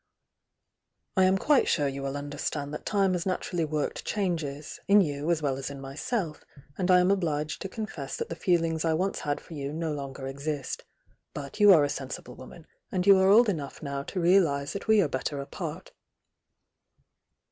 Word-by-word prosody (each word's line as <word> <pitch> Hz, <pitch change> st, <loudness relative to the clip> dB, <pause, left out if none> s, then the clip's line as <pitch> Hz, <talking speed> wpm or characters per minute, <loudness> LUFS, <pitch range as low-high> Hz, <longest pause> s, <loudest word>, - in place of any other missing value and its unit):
"I 190 Hz, -1 st, +5 dB
am 190 Hz, +1 st, +4 dB
quite 290 Hz, +6 st, +3 dB
sure 145 Hz, -3 st, +2 dB
you 135 Hz, 0 st, -4 dB
will 135 Hz, +1 st, -3 dB
understand 145 Hz, 0 st, -4 dB
that -, -, -6 dB
time 195 Hz, -3 st, +2 dB
has 180 Hz, 0 st, -2 dB
naturally 180 Hz, -2 st, -1 dB
worked 150 Hz, -1 st, -2 dB
changes, 160 Hz, -8 st, -3 dB
in 205 Hz, +1 st, +7 dB
you 145 Hz, -2 st, -2 dB
as 165 Hz, -3 st, +1 dB
well 135 Hz, -2 st, 0 dB
as 135 Hz, -, -4 dB
in 140 Hz, -1 st, -8 dB
myself, 150 Hz, -, -3 dB, 0.3 s
and 185 Hz, 0 st, -1 dB
I 180 Hz, -1 st, +7 dB
am 180 Hz, +2 st, +3 dB
obliged 155 Hz, -6 st, -1 dB
to 195 Hz, -, -4 dB
confess 185 Hz, -10 st, -5 dB
that -, -, -3 dB
the 165 Hz, -, -5 dB
feel 175 Hz, -1 st, +2 dB
mgs 160 Hz, -1 st, -1 dB
I 160 Hz, -1 st, +2 dB
once 190 Hz, +4 st, -1 dB
had 145 Hz, 0 st, -2 dB
for 170 Hz, -, -13 dB
you 140 Hz, -2 st, -4 dB
no 160 Hz, 0 st, -2 dB
longer 140 Hz, -2 st, -6 dB
exist. 140 Hz, +1 st, -4 dB, 0.5 s
But 140 Hz, +6 st, -7 dB
you 205 Hz, -1 st, +8 dB
are 160 Hz, -6 st, +7 dB
a -, -, +2 dB
sensible 130 Hz, -3 st, -6 dB
woman, 135 Hz, +6 st, -12 dB, 0.3 s
and 180 Hz, -1 st, 0 dB
you 200 Hz, -1 st, +8 dB
are 190 Hz, 0 st, +4 dB
old 225 Hz, +4 st, +7 dB
enough 155 Hz, -9 st, -3 dB
now 140 Hz, -1 st, -3 dB
to 185 Hz, +6 st, -5 dB
realise 170 Hz, -6 st, +3 dB
that 200 Hz, -, -6 dB
we 220 Hz, -2 st, +5 dB
are -, -, +1 dB
better 140 Hz, +1 st, -3 dB
apart." 140 Hz, -, -6 dB
155 Hz, 195 wpm, -28 LUFS, 140-185 Hz, 0.5 s, you